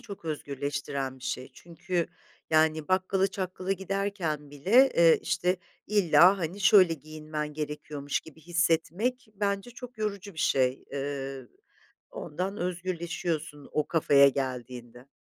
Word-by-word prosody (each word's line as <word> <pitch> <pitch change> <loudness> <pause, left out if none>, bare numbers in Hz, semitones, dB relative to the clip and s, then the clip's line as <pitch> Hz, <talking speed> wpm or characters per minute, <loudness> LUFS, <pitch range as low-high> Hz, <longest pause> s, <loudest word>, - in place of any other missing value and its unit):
çok 205 -8 -10
özgürleştiren 140 -2 -3
bir 130 - -12
şey. 130 +1 -3
Çünkü 170 +2 -3 0.4
yani 155 -1 +3
bakkala 190 +1 +2
çakkala 185 0 -3
giderken 190 -6 -3
bile, 210 - +5
eee, 165 -1 +6
işte, 180 +1 +1 0.3
illa, 185 -2 +5
hani, 180 +3 -4
şöyle 185 -4 +6
giyinmen 155 0 -6
gerekiyormuş 150 -1 -4
gibi 160 0 -15
hissetmek 175 - 0
bence 200 +2 -1
çok 245 0 -11
yorucu 200 -2 -4
bir - - -12
şey. 130 -3 +1
Eee, 135 -2 -4 0.6
ondan 185 +6 -4
özgürleşiyorsun 170 -4 -3
o 150 - 0
kafaya 140 -4 +5
geldiğinde. 125 -2 -5
165 Hz, 120 wpm, -28 LUFS, 145-190 Hz, 0.6 s, eee